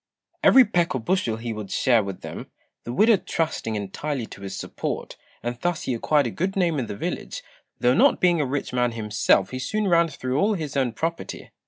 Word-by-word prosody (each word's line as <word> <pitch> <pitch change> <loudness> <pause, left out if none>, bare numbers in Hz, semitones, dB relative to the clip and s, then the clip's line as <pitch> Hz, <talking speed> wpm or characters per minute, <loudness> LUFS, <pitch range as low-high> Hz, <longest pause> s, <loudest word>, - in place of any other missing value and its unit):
Every 260 -1 +8
peck 175 -7 +1
or - - 0
bushel 115 -4 0
he 115 0 -4
would 105 -2 -7
share 120 +1 +3
with 100 -2 -6
them, - - -8 0.4
the 120 - -4
widow 215 - +5
trusting 160 -11 -2
entirely 115 +6 -3
to 100 - -12
his 100 -1 -6
support; - - -5 0.3
and 120 0 -3
thus 175 -2 -1
he 130 - -1
acquired 145 +5 +2
a - - -2
good 190 +4 -2
name 170 -6 +1
in 120 - -3
the 100 - -6
village, - - -4 0.4
though 125 +1 +4
not - - +4
being 175 -3 +3
a - - +1
rich 135 0 -3
man 125 -1 +1
himself 105 -3 +2
he 130 - -4
soon 215 +8 -1
ran 170 -2 +4
through 130 -2 -3
all 210 +4 +2
his 155 -6 -5
own 130 -4 +1
property. 165 +8 -4
130 Hz, 210 wpm, -24 LUFS, 115-170 Hz, 0.4 s, Every